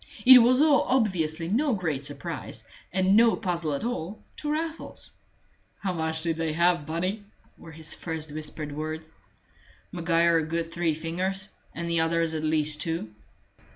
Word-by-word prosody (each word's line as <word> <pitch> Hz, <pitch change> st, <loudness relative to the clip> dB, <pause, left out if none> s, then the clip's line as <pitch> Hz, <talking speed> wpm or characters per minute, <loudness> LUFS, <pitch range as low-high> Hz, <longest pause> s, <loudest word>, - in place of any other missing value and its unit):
It 255 Hz, 0 st, +11 dB
was 250 Hz, +3 st, +4 dB
all 300 Hz, -3 st, +5 dB
obviously 170 Hz, -10 st, +1 dB
no 250 Hz, -, +1 dB
great 160 Hz, -8 st, -2 dB
surprise, -, -, -6 dB, 0.2 s
and 190 Hz, +1 st, +3 dB
no 230 Hz, +1 st, +6 dB
puzzle 170 Hz, -5 st, -2 dB
at 140 Hz, -, -4 dB
all, 215 Hz, -5 st, -3 dB, 0.2 s
to 295 Hz, -, -3 dB
Raffles. 320 Hz, +1 st, -4 dB, 0.7 s
"How 190 Hz, -2 st, -2 dB
much 160 Hz, -1 st, -1 dB
did 165 Hz, -2 st, 0 dB
they 165 Hz, -1 st, -1 dB
have, 170 Hz, -2 st, +2 dB
Bunny?" 185 Hz, +6 st, -2 dB, 0.3 s
were 165 Hz, -, -13 dB
his 160 Hz, +1 st, -3 dB
first 160 Hz, -2 st, -5 dB
whispered 150 Hz, 0 st, -4 dB
words. 155 Hz, +2 st, -5 dB, 0.8 s
"Maguire 170 Hz, -2 st, +2 dB
a -, -, -1 dB
good 165 Hz, +1 st, -3 dB
three 170 Hz, -2 st, 0 dB
fingers, 185 Hz, +5 st, -2 dB, 0.2 s
and 170 Hz, 0 st, -4 dB
the 170 Hz, -1 st, +1 dB
others 165 Hz, 0 st, +1 dB
at 155 Hz, -, -2 dB
least 155 Hz, -1 st, +2 dB
two." 160 Hz, -10 st, -3 dB
165 Hz, 155 wpm, -27 LUFS, 160-190 Hz, 0.8 s, It